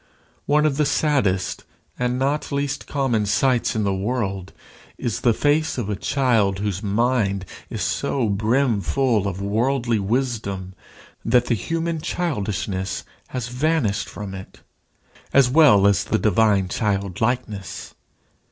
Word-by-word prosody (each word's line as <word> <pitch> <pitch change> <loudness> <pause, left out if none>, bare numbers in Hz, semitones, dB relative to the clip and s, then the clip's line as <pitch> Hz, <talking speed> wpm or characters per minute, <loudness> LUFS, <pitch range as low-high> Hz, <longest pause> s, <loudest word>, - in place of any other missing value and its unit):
One 150 +1 +3
of 145 -3 +1
the 150 - +3
saddest 130 - 0 0.4
and 125 0 0
not 140 +4 -1
least 140 0 -2
common 120 -7 0
sights 120 +4 +2
in 110 - 0
the 100 -1 +1
world 100 -2 -2 0.5
is 115 - -3
the 120 - +4
face 150 +6 +1
of 110 -4 -2
a - - -1
child 115 -4 +1
whose 100 -1 -2
mind 105 -2 0 0.2
is - - -3
so 125 -5 0
brimful 110 +1 +1
of 100 0 -4
worldly 120 +2 +1
wisdom 100 -4 -2 0.5
that 120 +1 +3
the 120 - +1
human 165 - -2
childishness 100 - -2 0.2
has 125 -2 -4
vanished 125 -5 0
from 100 -2 -7
it, 95 0 -10 0.7
as 135 -3 +5
well 135 -10 +6
as 100 -4 +4
the - - 0
divine 100 -2 +3
childlikeness. 100 0 -2
115 Hz, 130 wpm, -22 LUFS, 100-135 Hz, 0.7 s, well